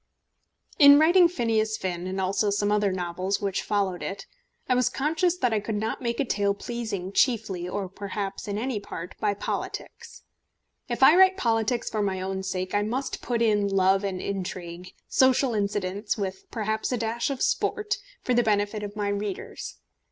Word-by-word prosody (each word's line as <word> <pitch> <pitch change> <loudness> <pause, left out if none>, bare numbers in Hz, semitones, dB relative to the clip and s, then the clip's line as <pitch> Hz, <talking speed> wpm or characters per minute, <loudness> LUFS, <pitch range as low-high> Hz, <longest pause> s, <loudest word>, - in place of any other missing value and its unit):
In 285 -1 +9
writing 345 +4 +6
Phineas 225 -8 0
Finn, 180 -1 -3
and 190 +1 -3
also 195 +2 +1
some 205 0 +1
other 210 -1 +2
novels 185 +2 -2
which 200 -2 -1
followed 195 -3 -1
it, 195 0 -5 0.4
I 255 - +3
was 250 -1 +2
conscious 325 +5 0
that 250 -9 +1
I 215 - +2
could 210 +1 -4
not 220 +4 -2
make 235 -1 -2
a 280 - +2
tale 200 -4 +1
pleasing 210 -5 -4
chiefly, 200 -7 +1
or 195 +1 -3
perhaps 195 +1 -5
in 205 0 -2
any 240 0 -2
part, 180 -3 -7
by 205 -1 +1
politics. - - -6 0.7
If 240 +2 0
I 300 +5 +8
write 375 +1 +6
politics 230 - 0
for 215 - -1
my 195 -2 -1
own 190 +1 -3
sake, 185 -1 -3
I 205 - +2
must 255 +6 -3
put 235 -1 0
in 210 -2 +2
love 195 0 +3
and 190 -2 -2
intrigue, 180 -2 -5
social 260 -1 +3
incidents, 205 0 -1
with 190 -2 -5
perhaps 220 0 -2
a 250 - 0
dash 230 +2 -1
of 275 -2 -2
sport, 420 0 0 0.3
for 250 - +1
the 240 - +4
benefit 210 -1 0
of 205 0 -6
my 205 -1 -1
readers. 200 -1 -5
205 Hz, 180 wpm, -26 LUFS, 195-240 Hz, 0.7 s, In